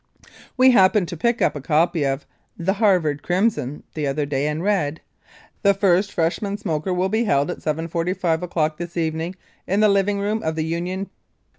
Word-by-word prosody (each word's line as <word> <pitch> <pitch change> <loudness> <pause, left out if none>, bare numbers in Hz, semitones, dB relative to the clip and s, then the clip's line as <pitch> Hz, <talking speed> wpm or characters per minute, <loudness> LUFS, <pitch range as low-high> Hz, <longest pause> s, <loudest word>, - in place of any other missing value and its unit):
We 255 +1 +7
happened 190 -4 +4
to 175 - -5
pick 235 +7 +1
up - - +2
a 145 - -5
copy 160 +2 +1
of 135 +1 -2 0.3
"The 180 +3 0
Harvard 180 -9 +2
Crimson" 175 - -1
the 150 -2 -2
other 145 +2 -1
day 140 0 -1
and 150 +2 -2
read: 165 -7 0 0.6
"The 200 -1 +4
first 195 0 +2
freshman 195 +5 -1
smoker 175 -4 -2
will 180 +1 +1
be 220 +4 0
held 145 -5 +1
at - - -7
7.45 165 +2 -1
o'clock 160 -3 -1
this 175 0 -6
evening 165 +2 -2 0.3
in 195 +3 +1
the 215 0 +5
living 200 0 +2
room 210 +2 -1
of 160 0 -2
the 160 -1 -1
Union. 180 +4 -3
175 Hz, 180 wpm, -22 LUFS, 155-200 Hz, 0.6 s, We